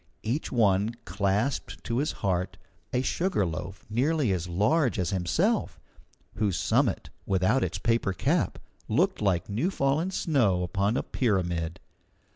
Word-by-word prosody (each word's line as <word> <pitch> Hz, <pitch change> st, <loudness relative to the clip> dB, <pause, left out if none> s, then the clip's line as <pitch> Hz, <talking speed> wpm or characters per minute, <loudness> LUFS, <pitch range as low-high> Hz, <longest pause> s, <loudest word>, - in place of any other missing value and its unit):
Each 125 Hz, +8 st, -2 dB
one 105 Hz, -1 st, +2 dB
clasped 100 Hz, +7 st, -1 dB
to 120 Hz, +1 st, -1 dB
his 150 Hz, -, 0 dB
heart 90 Hz, -1 st, 0 dB, 0.3 s
a 125 Hz, -, +1 dB
sugar 170 Hz, -, 0 dB
loaf 90 Hz, +3 st, -6 dB
nearly 130 Hz, +3 st, +1 dB
as 90 Hz, -2 st, -2 dB
large 115 Hz, -, +2 dB
as 90 Hz, -1 st, -1 dB
himself, 160 Hz, -, 0 dB, 0.6 s
whose 100 Hz, -4 st, +1 dB
summit, -, -, +1 dB, 0.2 s
without 95 Hz, +7 st, +2 dB
its -, -, -2 dB
paper 115 Hz, -4 st, +1 dB
cap, 95 Hz, -, 0 dB, 0.3 s
looked -, -, +1 dB
like 95 Hz, -4 st, +1 dB
new 115 Hz, -, 0 dB
fallen 155 Hz, 0 st, +1 dB
snow 120 Hz, -, +1 dB
upon 100 Hz, +6 st, 0 dB
a -, -, 0 dB
pyramid. 90 Hz, -7 st, -1 dB
105 Hz, 135 wpm, -27 LUFS, 95-135 Hz, 0.6 s, one